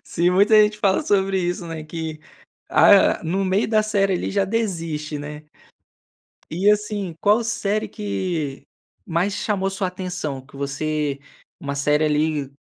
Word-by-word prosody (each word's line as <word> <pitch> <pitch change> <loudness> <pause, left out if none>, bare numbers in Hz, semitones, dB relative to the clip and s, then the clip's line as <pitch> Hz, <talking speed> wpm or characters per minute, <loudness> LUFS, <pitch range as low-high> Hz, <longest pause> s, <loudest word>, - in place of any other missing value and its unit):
Sim, 175 +1 0
muita 205 +4 +5
gente 210 0 0
fala 195 -2 +2
sobre 195 -1 +1
isso, 175 -1 -2
né, 160 -2 -6
que, 160 -1 -6 0.5
ah, - - +5
no 190 +4 -1
meio 190 +3 +1
da 215 -1 +3
série, 200 -3 +1
ali, - - -2
já 200 -1 +1
desiste, 165 -8 -3
né. 150 +1 -8 1.1
E 190 +6 +3
assim, 210 -3 -1
qual 215 +3 +3
série 215 -2 -1
que 135 - -4 0.4
mais 180 +4 -1
chamou 195 -3 -1
sua 195 -1 -2
atenção, 180 -6 -5
que 140 - -15
você 145 +1 -2 0.4
uma 140 0 -4
série 150 +2 +2
ali 150 -2 0
180 Hz, 145 wpm, -22 LUFS, 150-200 Hz, 1.1 s, muita